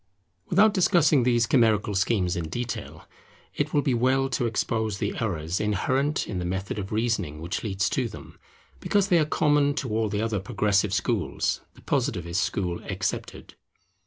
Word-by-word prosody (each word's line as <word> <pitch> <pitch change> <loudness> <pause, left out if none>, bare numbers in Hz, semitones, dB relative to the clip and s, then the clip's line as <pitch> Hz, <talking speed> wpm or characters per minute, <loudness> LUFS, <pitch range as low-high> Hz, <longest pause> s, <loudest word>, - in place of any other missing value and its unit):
Without 205 +4 +4
discussing 170 -7 +4
these 120 -1 +3
chimerical 110 -4 +2
schemes 95 -2 +1
in 85 -3 -3
detail, 120 +6 -5 0.5
it 145 +1 -2
will 145 -2 +2
be 135 - +1
well 130 +3 +2
to 120 -1 0
expose 110 -2 -1
the 100 0 -2
errors 85 -6 -2
inherent 130 - 0
in 95 - -3
the - - -3
method 95 +4 -3
of 95 -1 -6
reasoning 105 -9 -1
which 85 +4 -4
leads 100 -2 0
to 130 -3 0
them, - - -12 0.4
because 200 -1 +1
they 175 - +5
are 155 - +3
common 145 -2 +2
to 135 -4 -3
all 110 0 0
the 105 0 -2
other 110 -3 -1
progressive 100 -1 +1
schools, 95 -2 -1
the - - -17
Positivist 85 +3 -1
school 90 -3 -2
excepted. - - -4
110 Hz, 165 wpm, -26 LUFS, 95-135 Hz, 0.5 s, they